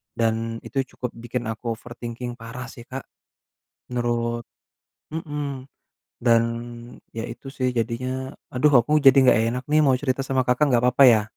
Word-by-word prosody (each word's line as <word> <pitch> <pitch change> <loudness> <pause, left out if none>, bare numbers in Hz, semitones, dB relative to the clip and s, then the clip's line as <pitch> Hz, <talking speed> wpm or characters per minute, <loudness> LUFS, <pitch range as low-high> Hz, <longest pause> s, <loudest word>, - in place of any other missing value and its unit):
Dan 115 0 0
itu 135 -1 -1
cukup 125 -2 -4
bikin 120 +1 -4
aku 115 +1 -3
overthinking 120 +1 -7
parah 125 +3 -7
sih 120 -2 -11
Kak. 135 0 -6 0.9
Menurut 120 -1 -1 0.7
mhm, 145 -4 -4 0.6
dan 115 -1 +5 0.7
ya 115 - -3
itu 135 +3 -9
sih 130 -1 0
jadinya, 130 +3 -2 0.2
aduh, 140 +4 +3
aku 150 0 +3
jadi 135 -3 +7
nggak 125 - +6 0.2
enak 125 - -4
nih 155 - +5
mau 130 - +5
cerita 135 -1 -1
sama 130 -1 +2
Kakak, 130 +4 +3
nggak 120 +1 +3
papa 135 +2 +5
ya? 110 -3 +6
125 Hz, 155 wpm, -24 LUFS, 115-130 Hz, 0.9 s, jadi